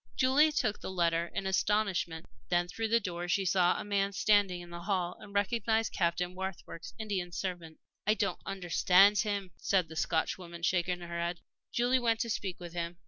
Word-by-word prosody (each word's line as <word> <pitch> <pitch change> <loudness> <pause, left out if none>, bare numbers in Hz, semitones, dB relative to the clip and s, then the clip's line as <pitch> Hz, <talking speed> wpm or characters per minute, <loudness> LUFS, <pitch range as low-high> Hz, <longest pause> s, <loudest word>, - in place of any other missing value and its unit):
Julie 280 +4 +4
took 215 -7 0
the - - -5
letter 170 -2 +1
in 195 - -2
astonishment. 190 -4 0 0.2
Then 175 0 +2
through 225 +5 -3
the 230 +1 +3
door 175 -4 -4
she 190 +2 +1
saw 180 -1 +3
a - - -4
man 200 -1 0
standing 200 -3 +3
in 175 0 -11
the 170 0 -7
hall 180 -2 -1
and 205 - -12
recognized 220 +2 0
Captain 175 0 0
Warkworth's 185 -3 -7
Indian 195 -5 -3
servant. 170 -3 -5 0.3
"I 215 - +4
don't 205 -2 -1
understand 195 +2 +4
him," 200 -4 -1
said 185 -5 +1
the 160 - -9
Scotchwoman, 170 +1 -2
shaking 180 0 +1
her 170 0 -5
head. 170 0 -2 0.3
Julie 245 +2 +2
went 230 -2 +2
out - - -3
to 235 - -2
speak 190 -2 -3
with 175 -2 -8
him. 170 0 -4
185 Hz, 190 wpm, -31 LUFS, 175-205 Hz, 0.3 s, Julie